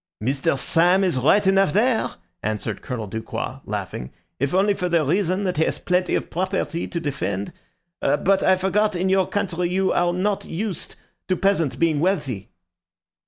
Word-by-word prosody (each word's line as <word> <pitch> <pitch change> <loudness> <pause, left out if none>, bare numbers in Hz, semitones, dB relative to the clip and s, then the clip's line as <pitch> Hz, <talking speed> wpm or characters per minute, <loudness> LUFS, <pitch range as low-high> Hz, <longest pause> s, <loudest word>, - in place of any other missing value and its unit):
"Mr. 135 +4 0
Syme 175 +7 +3
is 175 -9 +1
right 195 +10 +4
enough 195 -4 +4
there," 225 +3 +3 0.3
answered 110 -1 -3
Colonel 125 -5 -4
Ducroix, 110 +3 -5
laughing, 60 - -4 0.3
"if 140 +1 0
only 195 +3 +3
for 180 -2 -2
the 170 -3 +2
reason 185 +5 +1
that 180 -4 -1
he 160 - +4
has - - -1
plenty 180 0 0
of - - -3
property 185 -1 -2
to 170 - -3
defend. 140 - -3 0.5
But 190 +6 +2
I 190 - +5
forgot 205 +3 +1
that 175 - -3
in 190 +1 +1
your 190 -1 +3
country 180 -4 -1
you 190 +1 +1
are 175 0 +2
not 195 +3 0
used 195 +1 -4 0.3
to 185 - +2
peasants 180 -7 +1
being 160 -3 +1
wealthy." 145 - -1
180 Hz, 170 wpm, -23 LUFS, 145-195 Hz, 0.5 s, I